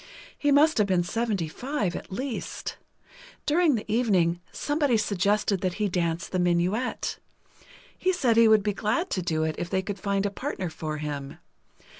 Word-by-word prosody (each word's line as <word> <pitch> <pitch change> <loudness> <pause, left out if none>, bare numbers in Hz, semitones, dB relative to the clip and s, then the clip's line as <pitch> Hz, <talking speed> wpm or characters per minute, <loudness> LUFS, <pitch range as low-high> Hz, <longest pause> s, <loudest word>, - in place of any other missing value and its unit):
He 290 - +1
must 295 -1 +5
have 210 - +3
been 185 -2 +2
seventy 210 -3 -1
five, 220 - -2
at - - -7
least. 255 +5 -4 0.7
During 310 -1 +3
the 215 - -3
evening, 185 -7 +2
somebody 290 -5 +1
suggested 205 -1 +1
that 185 -2 -1
he 210 -1 0
dance 170 -1 -1
the 185 - -2
minuet. 180 +7 0 0.8
He 370 - +1
said 265 -11 +2
he 230 0 +7
would 215 -2 +5
be 210 0 0
glad 335 - -1
to 185 - 0
do 160 -2 0
it, 160 0 0
if 175 - -3
they 190 0 0
could 200 0 -5
find 200 0 0
a 200 - 0
partner 195 - -4
for 155 -1 -4
him. 145 -2 -5
200 Hz, 175 wpm, -27 LUFS, 175-240 Hz, 0.8 s, he